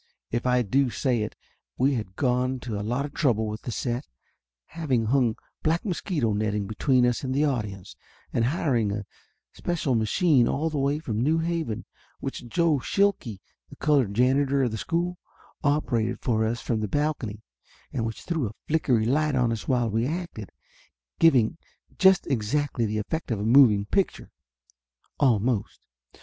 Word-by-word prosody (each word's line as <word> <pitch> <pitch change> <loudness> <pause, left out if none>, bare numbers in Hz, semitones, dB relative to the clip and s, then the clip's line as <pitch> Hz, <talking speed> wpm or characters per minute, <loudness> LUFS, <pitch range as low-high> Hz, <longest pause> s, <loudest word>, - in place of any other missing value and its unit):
If 120 +2 -1
I 125 0 +3
do 130 +5 +2
say 125 -1 0
it 105 - -4 0.4
we 135 +3 +3
had 105 -6 -4
gone 125 0 0
to 110 -4 -4
a - - -3
lot 120 +7 -1
of 145 - -8
trouble 115 -8 +1
with 105 0 -5
the 120 - -5
set, 120 +3 -3 0.6
having 135 -9 -1
hung 120 -1 +2 0.3
black 165 +5 0
mosquito 170 - -1
netting 105 -1 -1
between 125 +5 +2
us 120 +2 0
and 130 0 -2
the 145 +2 +3
audience, 105 -9 -3 0.4
and 115 - +2
hiring 125 - +1
a 105 0 -4 0.5
special 165 -6 -1
machine 125 - +3
all 160 +3 0
the 150 - -1
way 140 +2 +1
from 115 -8 -3
New 155 +6 +2
Haven, 165 -9 -2 0.3
which 120 - -6
Joe 160 +3 +2
Shilke, 155 - 0 0.3
the - - -12
colored 135 -9 +2
janitor 135 +3 +3
of 120 - 0
the 110 - -3
school, 175 - -2 0.4
operated 125 -6 0
for 110 -3 +1
us 115 +2 -2
from 115 -3 -1
the 105 - -2
balcony 130 -6 -2 0.5
and 115 - -1
which 115 -1 -4
threw 160 -8 -1
a 105 - -13
flickery 130 -8 +2
light 150 +4 +1
on 125 -2 +2
us 115 -2 -4
while 125 -3 +2
we 115 +3 +1
acted, 165 - -5 0.7
giving 150 -3 +4 0.4
just 190 -1 +5
exactly 125 0 0
the 105 +1 -2
effect 160 +10 -3
of 115 -4 -1
a 105 - -2
moving 115 -4 +6
picture 195 - -1 0.9
almost. 120 -4 +1
125 Hz, 165 wpm, -26 LUFS, 110-150 Hz, 0.9 s, moving